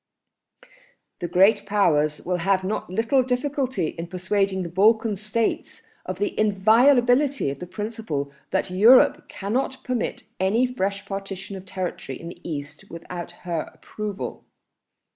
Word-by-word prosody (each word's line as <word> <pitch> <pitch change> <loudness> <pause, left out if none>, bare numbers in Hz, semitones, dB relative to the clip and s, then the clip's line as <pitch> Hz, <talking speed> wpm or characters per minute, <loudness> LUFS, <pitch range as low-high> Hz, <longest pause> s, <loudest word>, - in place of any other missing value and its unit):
"The 175 - -3
Great 195 +5 +4
Powers 155 -8 +2
will 180 0 0
have 190 +2 +1
not 195 0 -3
little 225 +8 +2
difficulty 255 - -1
in 165 0 -7
persuading 190 +1 0
the 170 - -5
Balkan 215 +4 +3
States 215 +3 -2 0.2
of - - -3
the 410 -3 -1
inviolability 245 - +4
of 140 - -8
the 180 - -7
principle 185 -7 -4 0.2
that 190 -1 -1
Europe 220 +8 +5
cannot 255 +6 -2
permit 250 -3 -2 0.2
any 205 +7 +3
fresh 200 -5 -2
partition 195 0 -6
of 190 0 -10
territory 180 -8 -5
in 170 - -7
the 175 - -12
East 145 -2 -6
without 175 +1 -7
her 170 -3 -2
approval. 210 -2 -6
195 Hz, 135 wpm, -24 LUFS, 180-225 Hz, 0.2 s, Europe